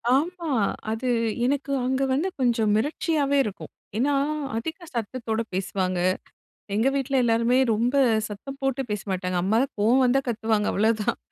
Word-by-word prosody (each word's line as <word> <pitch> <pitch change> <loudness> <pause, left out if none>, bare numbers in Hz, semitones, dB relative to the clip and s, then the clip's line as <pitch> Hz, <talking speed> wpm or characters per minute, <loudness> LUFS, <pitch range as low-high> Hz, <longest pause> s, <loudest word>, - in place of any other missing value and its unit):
ஆமா. 335 +2 -1 0.4
அது 235 +3 -3 0.4
எனக்கு 280 +1 -1
அங்க 260 +1 0
வந்து 310 +8 +1
கொஞ்சம் 230 -4 +2
மிரட்சியாவே 290 +3 +1
இருக்கும். 205 -2 -7 0.3
ஏன்னா, 280 +5 +2 0.4
அதிக 320 +9 -5
சத்தத்தோட 230 0 -2
பேசுவாங்க. 185 -1 -1 0.8
எங்க 225 +5 +2
வீட்ல 275 0 -1
எல்லாருமே 235 +2 +3 0.2
ரொம்ப 240 +5 0 0.3
சத்தம் 270 +7 -8
போட்டு 270 0 0
பேச 210 -1 -2
மாட்டாங்க. 180 -1 -1
அம்மா 215 +4 +2
தான் 275 - -5
கோவம் 245 +5 +4
வந்தா, 260 +2 +3
கத்துவாங்க. 220 -2 0
அவ்வளோதான். 215 0 +1
240 Hz, 140 wpm, -25 LUFS, 215-275 Hz, 0.8 s, கோவம்